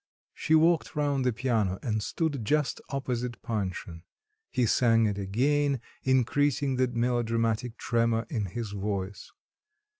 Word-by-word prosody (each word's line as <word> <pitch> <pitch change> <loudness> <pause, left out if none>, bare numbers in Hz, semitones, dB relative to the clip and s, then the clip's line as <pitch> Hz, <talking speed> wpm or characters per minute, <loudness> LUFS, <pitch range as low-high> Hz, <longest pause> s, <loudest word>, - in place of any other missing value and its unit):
She 160 - +2
walked 165 +1 +3
round 145 -3 +1
the 125 - +2
piano 110 -5 0
and 110 -3 -1
stood 145 +1 -2
just 150 +5 0
opposite 125 -3 -3
Panshin. 95 -7 -4 0.5
He 125 - +1
sang 115 0 +4
it 100 -1 -1
again, 135 +8 +1 0.2
increasing 130 +1 +2
the 130 0 +3
melodramatic 115 -1 0
tremor 115 -1 +1
in 110 -4 -2
his 105 +3 -5
voice. 100 -1 -4
120 Hz, 125 wpm, -28 LUFS, 110-135 Hz, 0.5 s, sang